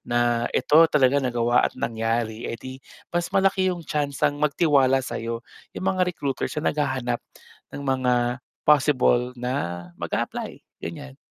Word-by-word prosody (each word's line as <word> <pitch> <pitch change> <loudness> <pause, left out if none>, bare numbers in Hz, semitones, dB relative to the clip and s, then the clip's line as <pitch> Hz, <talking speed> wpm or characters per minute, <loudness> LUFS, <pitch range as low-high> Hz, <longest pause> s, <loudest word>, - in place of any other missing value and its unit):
na 120 0 +1
ito 160 +2 +5
talaga 140 -2 +3
nagawa 120 -2 +2
at - - -23
nangyari, 115 0 -2
eh, 115 - -4
'di 130 +2 -9 0.3
mas 175 -1 0
malaki 195 -1 +2
yung 175 -2 -3
tsansang 145 0 -1
magtiwala 140 -4 +3
sa'yo, 115 0 -4 0.3
yung - - -4
mga 185 -1 +1
recruiters 140 -3 -3
na 150 - +1
naghahanap 130 -5 -1 0.5
ng 140 - -7
mga 130 -2 +1 0.5
possible 130 -4 +3
na 120 -9 -3 0.2
mag-aapply, - - -3 0.2
ganiyan. 65 0 -7
130 Hz, 135 wpm, -24 LUFS, 120-150 Hz, 0.5 s, ito